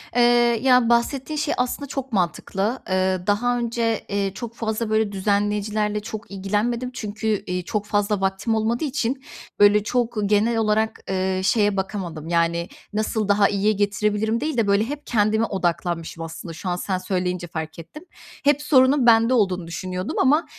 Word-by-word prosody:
Eee, 245 - +4 0.4
ya, 250 -3 +5
bahsettiğin 265 +5 +1
şey 300 0 0
aslında 250 +3 -2
çok 265 -2 -5
mantıklı. 195 +6 -1
Eee, 185 0 +1
daha 245 +4 +2
önce, 230 -2 -1
eee, 200 -1 -1
çok 230 +3 -7
fazla 220 -1 -2
böyle 220 -1 +1
düzenleyicilerle 210 +1 0
çok 215 0 -8
ilgilenmedim 215 +6 -1
çünkü, 215 -2 -2
iii, 180 0 -2
çok 210 +3 -3
fazla 205 -1 0
vaktim 195 +4 0
olmadığı 225 +5 0
için 265 -2 -2 0.4
böyle 205 0 +6
çok 240 0 -1
genel 215 +3 +2
olarak, 220 0 +1
ııı, 190 0 -1
şeye 205 -1 +2
bakamadım. 175 -5 -4
Yani, 170 0 +1 0.3
nasıl 215 0 -1
daha 205 0 +4
iyiye 205 +1 +2
getirebilirim 210 +3 0
değil 305 -3 -2
de 225 -3 +2
böyle 200 +1 +3
hep 290 +3 -6
kendime 220 0 +2
odaklanmışım 170 -4 -2
aslında 165 +1 -7
şu 185 - -5
an 175 - 0
sen 185 +1 -2
söyleyince 180 -1 -2
fark 160 0 -6
ettim. 305 - -11 0.4
Hep 290 0 +3
sorunun 270 -2 +4
bende 230 +1 +5
olduğunu 185 -7 +1
düşünüyordum 185 +2 -4
ama, 295 +5 +3
210 Hz, 160 wpm, -23 LUFS, 190-235 Hz, 0.4 s, böyle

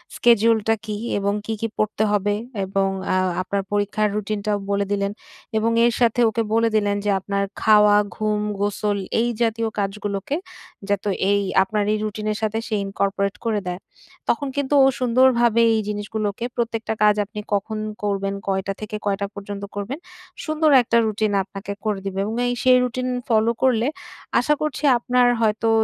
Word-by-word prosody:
স্কেডিউলটা 225 -1 +4
কি 210 -1 -3 0.2
এবং 200 0 0
কি, 225 - -2
কি 225 - 0
পড়তে 215 0 0
হবে 205 0 +1 0.3
এবং 195 0 0 0.2
অ্যা 185 - +2 0.2
আপনার 195 +2 -2
পরীক্ষার 205 +1 +1
রুটিনটাও 210 0 -1
বলে 200 0 +1
দিলেন। 200 0 0 0.5
এবং 225 +1 +1
এর 240 - +3
সাথে 240 0 +2
ওকে 230 +1 -1
বলে 230 0 +3
দিলেন 205 -1 +2
যে - - +1
আপনার 200 +1 -2 0.2
খাওয়া, 210 -1 +6 0.2
ঘুম, 215 -1 0 0.2
গোসল 205 0 0 0.2
এই 235 - +2
জাতীয় 230 0 +1
কাজগুলোকে 200 +4 -2 0.5
যাতে 205 0 0 0.2
এই 200 0 +3 0.2
আপনার 210 +2 -1
এই - - +1
রুটিন 215 0 -4
এর 210 - -2
সাথে 220 0 -1
সে - - -4
ইনকর্পোরেট 200 0 -1
করে 220 -2 +1
দেয়। 180 0 -3 0.5
তখন 280 +4 +1
কিন্তু 285 0 -1
ও - - +7
সুন্দরভাবে 240 -2 +4
এই 220 - +1
জিনিসগুলোকে 210 +1 -3
প্রত্যেকটা 230 -2 -2
কাজ 210 -1 +5
আপনি 210 +1 -8
কখন 205 +2 -1 0.3
করবেন, 195 -1 -1
কয়টা 195 0 -1
থেকে 215 0 -5
কয়টা 200 0 0
পর্যন্ত 200 0 -7
করবেন। 210 +9 -4 0.5
সুন্দর 310 0 +2
একটা 235 0 +1
রুটিন 215 0 0
আপনাকে 195 +1 -7
করে 210 -2 -1
দিবে। 195 0 -3
এবং 220 +2 -3
এই, 245 - 0
সেই 255 -1 +6
রুটিন 250 +1 -2 0.2
ফলো 225 0 +3
করলে, 245 -2 +3 0.5
আশা 275 +5 +2
করছি 305 -1 -3
আপনার 245 +1 +2
হয়তো 220 0 +1
215 Hz, 165 wpm, -22 LUFS, 200-230 Hz, 0.5 s, ও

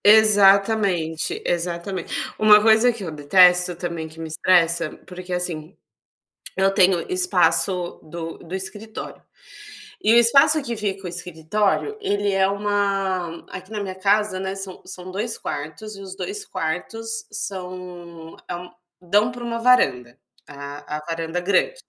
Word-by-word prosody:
Exatamente, 200 -5 +4
exatamente, 175 +1 -3 0.3
uma 215 -1 +8
coisa 220 +3 +5
que 230 -4 -8
eu 165 - -5
detesto 180 +4 +4
também, 170 -2 -4
que 160 +1 -15
me 165 - -5
estressa, 170 -1 +2 0.2
porque 180 0 -9
assim, 175 -1 -4 0.8
eu 195 0 +3
tenho 185 -2 +4
espaço 195 - +1
do 165 +1 -7
do 175 +2 -7
escritório, 205 +3 -7 0.8
e 215 - +5
o - - +7
espaço 275 +7 +5
que 235 -3 -4
fica 195 -2 -3
o - - -3
escritório, 180 - -1
ele 205 - 0
é 195 0 +3
uma 195 -4 -1
aqui 185 +3 -9
na 210 -1 -3
minha 190 -1 -5
casa, 200 0 +1
né, 190 0 -3
são 195 -1 -8
são 185 0 -9
2 215 +4 -3
quartos 160 +9 -6
e - - -10
os 190 -1 -8
2 415 +1 -5
quartos 225 - -4
são 180 -4 -7
é 175 - -2
um 180 +1 -9 0.3
dão 205 +6 +2
pra 245 0 -9
uma 230 -1 -3
varanda, 130 - +2 0.3
a 145 +1 -7
a 150 - -10
varanda 165 +1 -3
grande, 200 - +1
190 Hz, 145 wpm, -22 LUFS, 170-210 Hz, 0.8 s, uma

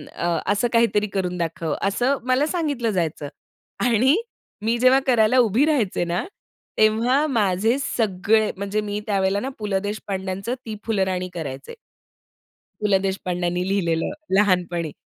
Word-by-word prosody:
अ, 170 0 0
असं 225 +4 +1
काहीतरी 210 -2 +3
करून 180 -1 -1
दाखव." 165 -2 -2
असं 245 +8 +1
मला 255 +3 +3
सांगितलं 290 -10 -1
जायचं 160 -5 -2 0.6
आणि 250 - +4 0.5
मी 230 +1 +2
जेव्हा 255 +2 +5
करायला 240 0 +4
उभी 235 +5 +3
राहायचे 240 - +1
ना, 175 +2 -1 0.5
तेव्हा 230 +7 +3
माझे 220 +1 +1
सगळे 215 -3 +1
म्हणजे 200 +2 -2
मी 205 0 -3
त्यावेळेला 195 -1 +1
ना 265 - -3
पु. 210 - -4
ल. 195 -1 +1
देशपांड्यांचं 195 +1 -4
ती 220 -1 -5
फुलराणी 190 -4 -1
करायचे. 140 -5 -6 1.1
पु. 210 - +1
ल. 195 - +4
देशपांड्यांनी 180 -2 -2
लिहिलेलं 170 -5 0 0.3
लहानपणी. 175 -5 +1
205 Hz, 135 wpm, -23 LUFS, 180-235 Hz, 1.1 s, जेव्हा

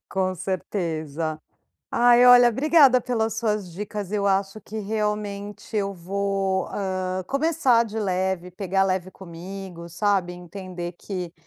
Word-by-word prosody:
Com 185 -1 -1
certeza. 160 -4 -3 0.5
Ai, 245 +1 +6
olha, 245 -1 +8
obrigada 275 0 +5
pelas 225 -3 -1
suas 210 -5 -1
dicas. 205 +1 -5
Eu 200 -1 +1
acho 195 +2 0
que 220 +1 -6
realmente 210 0 -3
eu 200 -1 0
vou, 195 +1 -1
hã, 185 -1 -2
começar 275 -5 +2
de 220 0 -6
leve, 185 -2 -1
pegar 195 +1 0
leve 185 -1 -1
comigo, 180 0 -9
sabe, 180 0 0
entender 180 0 -7
que 180 -2 -6
195 Hz, 125 wpm, -24 LUFS, 180-215 Hz, 0.5 s, olha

